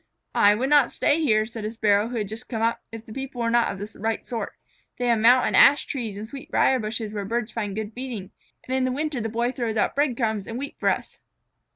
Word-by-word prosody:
"I 205 0 +5
would 260 +6 -1
not 290 -4 +5
stay 300 +3 +2
here," 215 -8 +3
said 225 -1 -7
a 215 - -3
Sparrow 210 -2 +2
who 240 0 -4
had 210 -2 -2
just 225 +4 -8
come 225 -3 -2
up, 230 0 +1
"if 225 0 -9
the 220 - -10
people 270 -1 -6
here 235 - 0
were 230 - +1
not 235 0 +3
of 195 - -7
the 205 +2 -8
right 225 +1 -2
sort. 235 -3 -4 0.4
They 245 - -2
have 230 -2 +3
mountain 245 +3 +5
ash 290 +1 +6
trees 225 -7 -4
and 215 +2 -6
sweetbrier 265 0 +1
bushes 215 -1 -4
where 205 -1 -3
birds 230 +3 -2
find 205 -4 -3
good 215 0 -4
feeding. 235 -6 -6 0.4
And 260 - -1
in 260 -1 +1
the 255 - 0
winter 290 -1 -2
that 225 - -2
Boy 235 +2 0
throws 235 -4 -3
out 210 - +1
bread 280 -4 +1
crumbs 220 -5 -1
and 230 - -5
wheat 280 +2 -5
for - - +2
us." - - -3
230 Hz, 255 wpm, -24 LUFS, 215-255 Hz, 0.4 s, ash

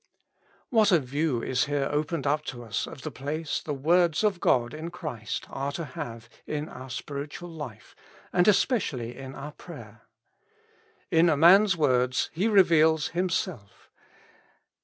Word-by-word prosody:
What 220 -4 +4
a 175 - +7
view 140 -2 -1
is 130 0 +1
here 140 -1 -1
opened 150 0 -1
up 150 +2 +1
to 120 -2 -6
us 110 -4 -3
of 135 - -10
the 155 - -4
place 145 +4 -3
the 150 - -4
words 170 +5 +2
of 205 -4 +1
God 120 -6 +2
in 160 +2 -6
Christ 150 -11 -5
are 140 +1 -3
to 170 - -4
have 115 -4 -7 0.2
in 150 0 -3
our 130 +1 -10
spiritual 145 +6 -6
life, 140 -10 -9 0.4
and 180 +1 +3
especially 150 - +1
in 135 0 -9
our 145 +2 -7
prayer. - - -12 1.1
In 165 0 +5
a 155 - +2
man's 190 +4 +6
words 125 -4 +1
he 185 +7 0
reveals 160 -7 +4
hitnself. 170 - -3
150 Hz, 150 wpm, -27 LUFS, 130-170 Hz, 1.1 s, a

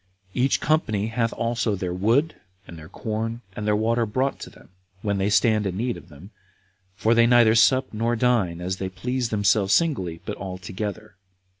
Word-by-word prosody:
Each 130 +2 +1
company 110 -9 0
hath 115 0 0
also 115 -2 -1
their 90 -2 -3
wood, 115 - +2 0.3
and 85 - -10
their 80 -1 -11
corn, 115 +2 -4
and 105 - -4
their 105 - +3
water 115 +2 +1
brought 130 +6 -1
them, - - -12 0.3
when 100 -2 0
they 95 +1 +1
stand 105 -1 +3
in 95 -1 -4
need 120 +2 -1
of - - -13
them; 85 +7 -14 0.6
for 110 +3 +2
they 115 0 +5
neither 120 -2 +5
sup 130 +3 +3
nor 115 +2 0
dine 110 -8 +1
as 90 +1 -3
they 95 -1 -4
please 120 +6 -3
themselves 100 -1 +2
singly, 95 - 0
but - - -5
all 95 -1 -6
together. 105 +2 -6
110 Hz, 180 wpm, -24 LUFS, 95-120 Hz, 0.6 s, they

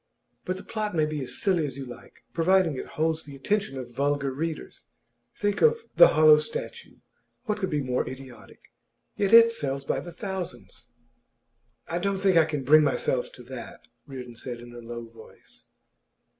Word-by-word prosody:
'But 185 +1 -2
the - - -9
plot 215 -3 -3
may 155 -2 +3
be 150 -1 -3
as 130 - -5
silly 185 -5 +1
as 135 -1 -8
you 135 - -6
like, 125 - -13
providing 170 -1 +3
it - - -6
holds 160 0 +1
the 145 -2 -11
attention 195 0 -1
of 120 -2 -7
vulgar 140 0 0
readers. 160 +4 -5 0.5
Think 205 -1 -1
of 465 0 +4
"The - - +9
Hollow 155 -1 +7
Statue", 470 - -6 0.5
what 210 -4 -2
could 190 -2 -1
be 150 -4 -1
more 125 -1 -1
idiotic? 130 -4 -12 0.4
Yet 200 -1 0
it 230 0 +9
sells 140 -9 -3
by - - -1
thousands.' 175 - -7 1.0
'I 170 - -2
don't 200 +1 -1
think 190 -2 +3
I 165 -2 +6
can 150 -3 -3
bring 155 +4 +7
myself 130 -3 0
to 125 - -12
that,' 120 -1 -10 0.2
Reardon 125 -3 -8
said, 120 -1 -6
in 120 0 -12
a 120 - -9
low 120 0 -7
voice. 115 -1 -14
150 Hz, 175 wpm, -26 LUFS, 130-190 Hz, 1.0 s, The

